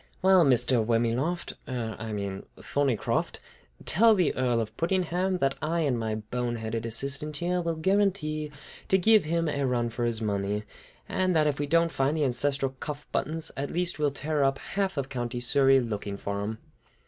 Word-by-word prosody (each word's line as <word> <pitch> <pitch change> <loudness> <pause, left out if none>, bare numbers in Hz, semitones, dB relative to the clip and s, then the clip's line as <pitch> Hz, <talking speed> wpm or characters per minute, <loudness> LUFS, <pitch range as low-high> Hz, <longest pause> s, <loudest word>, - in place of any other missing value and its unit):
Well, 190 -2 +6
Mr. 125 -3 +3
Wormyloft, 120 +9 0
er, 115 -4 -3
I 110 0 -5
mean 100 -2 -3 0.2
Thorneycroft, 140 -5 0 0.5
tell 225 +5 +5
the 180 -6 +2
Earl 125 -2 +1
of 110 -1 -4
Puddingham 185 +2 0
that 135 0 +2
I 165 +2 0
and 135 -6 +1
my 110 -1 -2
bone 120 +3 -3
headed 115 0 -3
assistant 140 +6 +1
here 180 +2 0
will 165 -1 -1
guarantee 160 -4 0 0.4
to 190 - +4
give 215 0 +4
him 165 +1 0
a 140 -2 -1
run 120 -2 0
for 120 +1 -2
his 115 -2 -1
money, 105 -1 -1 0.4
and 185 -1 0
that 155 -1 +4
if 145 -2 0
we 145 - -1
don't 165 +2 +3
find 140 +2 0
the 150 - +2
ancestral 135 +2 0
cuff 150 -1 -6
buttons, 160 +1 -1
at 140 +1 -3
least 175 -2 -2
we'll 150 -1 +3
tear 145 +1 -1
up 135 0 +2
half 195 0 -2
of 135 -1 -1
County 120 -2 -3
Surrey 135 +2 +4
looking 105 -4 -4
for 100 0 -3
them!" 110 +2 -3
140 Hz, 185 wpm, -28 LUFS, 115-165 Hz, 0.5 s, Well